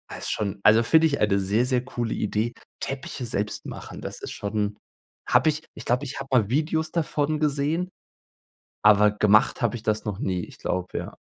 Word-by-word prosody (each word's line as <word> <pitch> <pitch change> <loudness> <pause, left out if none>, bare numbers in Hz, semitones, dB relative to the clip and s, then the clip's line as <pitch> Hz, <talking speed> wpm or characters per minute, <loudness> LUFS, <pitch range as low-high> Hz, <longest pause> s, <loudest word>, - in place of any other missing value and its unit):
Also, - - -7
ist - - -1
schon 100 -1 -2
also 110 +2 +6
find 160 +8 +5
ich 150 -3 +2
eine 100 -2 +3
sehr, 100 +5 +1
sehr 125 -1 +1
coole 120 -3 -3
Idee. 110 +3 -1 0.3
Teppiche 135 -1 -4
selbst 105 -2 -3
machen, - - -8
das - - -7
ist - - -6
schon, 105 0 -2 0.5
habe - - +4
ich 155 +1 -2
ich - - -10
glaube, 125 +3 +1
ich 135 - -5
habe 135 - -6
mal 115 -6 +3
Videos 155 +4 0
davon 155 -2 0
gesehen, 150 +4 0 0.9
aber 105 0 +6
gemacht 105 +5 +3
hab 120 -1 +1
ich 110 - -7
das 110 -1 0
noch 105 -2 -3
nie. 90 -4 -1
Ich - - -15
glaube, 90 0 -3
ja. - - -5
120 Hz, 195 wpm, -25 LUFS, 105-140 Hz, 0.9 s, also